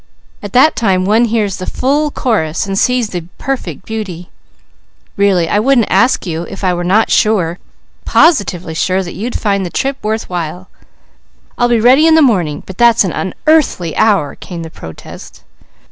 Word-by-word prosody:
At 205 -2 -8
that 265 +5 +4
time 190 -5 +1
one 220 +4 +3
hears 215 -4 -1
the 185 - -7
full 290 +4 0
chorus, 200 - -1
and 195 0 -3
sees 245 +2 +1
the 175 -3 -5
perfect 195 - -5
beauty. 195 -6 -6 0.8
Really, 195 -4 +2
I 205 - +1
wouldn't 245 -1 +2
ask 200 +6 +2
you, 165 -2 -3
if 195 - -9
I 185 -1 +2
were 175 0 -3
not 200 +5 +2
sure, 185 -6 +1 0.4
positively 195 - +2
sure, 185 +4 0
that 175 - -8
you'd 230 +6 -4
find 200 -2 0
the 180 - -4
trip 270 +8 -2
worth 220 +1 -2
while." 180 +1 -5 0.9
"I'll 245 0 +1
be 235 -1 +2
ready 260 +8 +5
in 320 - +5
the 320 - +5
morning, 180 - 0
but 190 - -11
that's 235 -2 +5
an 185 - -2
unearthly 195 - 0
hour!" 195 -10 +2
came 170 -2 -8
the 160 - -9
protest. 80 - -12
200 Hz, 175 wpm, -14 LUFS, 180-240 Hz, 0.9 s, ready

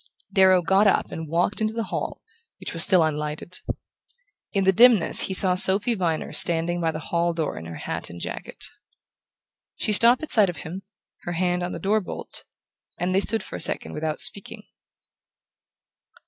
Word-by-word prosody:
Darrow 190 -2 +4
got 190 +4 +3
up - - 0
and 160 -2 -7
walked 175 +6 0
into 215 +1 -2
the 230 - -2
hall, - - -5 0.4
which - - -6
was 165 - +4
still 185 -2 +6
unlighted. 150 +3 -4 0.9
In 195 -2 0
the 190 - +4
dimness 230 -3 +5
he 190 - -4
saw 185 -1 +4
Sophy 195 +5 +2
Viner 170 -6 -3
standing 170 +1 +1
by 165 - 0
the 155 - -4 0.2
hall 170 0 0
door 160 -3 -3
in 80 - -9
her 80 0 -9
hat - - -6
and 85 - -10
jacket. - - -7 1.1
She 215 - -2
stopped 235 +6 +6
at 315 - -6
sight 210 -4 +4
of 175 - -7
him, 180 +4 -7 0.4
her 175 - -6
hand 180 +1 -1
on 175 0 -4
the - - -6
door 210 +2 0
bolt, 180 - -8 0.5
and 180 +1 -2
they 190 - +3
stood 225 +2 0
for - - -10
a - - -4
second - - -2
without 155 0 -4
speaking. 210 +2 +1
180 Hz, 180 wpm, -23 LUFS, 165-200 Hz, 1.1 s, still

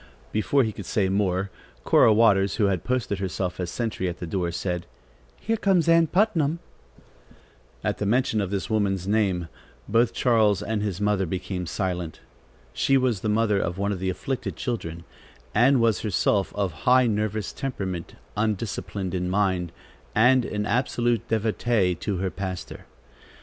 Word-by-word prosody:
Before 130 +6 +2
he 110 - -1
could 100 -3 -9
say 95 -3 +1
more, 95 -1 0 0.3
Cora - - +5
Waters, 100 -3 +4
who 105 - +2
had 95 -3 0
posted 125 -6 -1
herself 95 -1 -3
as 90 -1 -2
a - - -7
sentry 110 -5 -2
at 85 - -6
the - - -6
door 85 +1 -1
said: 90 0 -3 0.5
"Here 225 0 -1
comes 190 -5 +2
Ann 165 0 +5
Putnam." 170 -5 +2 1.3
At - - -2
mention 110 +1 +1
of 100 - -2
this 100 -1 -2
woman's 100 -4 0
name, 100 -5 +1 0.4
both 115 +2 +3
Charles 110 -5 +2
and 110 -1 -2
his 100 -4 -2
mother 105 -2 +1
became 90 0 -4
silent. 90 -2 -3 0.5
She 135 - +3
was 125 -6 +1
the 110 - -1
mother 105 -1 +2
of 85 0 -2
one 100 +1 0
of 95 - -3
the 95 0 -1
afflicted 130 +8 -3
children, 85 -9 -4 0.5
and 125 +4 +4
was 115 -4 +2
herself 100 -1 +1
of 100 -3 0 0.2
high 130 0 +6
nervous 110 -2 -1
temperament, 95 - -4 0.2
undisciplined 105 -3 -2
in 90 -1 -1
mind, 95 -3 0 0.4
and 125 +2 +5
an 105 0 -2
absolute 120 0 0
devotee 110 -3 +1
to 95 +3 -3
her 95 0 -2
pastor. 95 -2 -6
105 Hz, 160 wpm, -25 LUFS, 95-115 Hz, 1.3 s, high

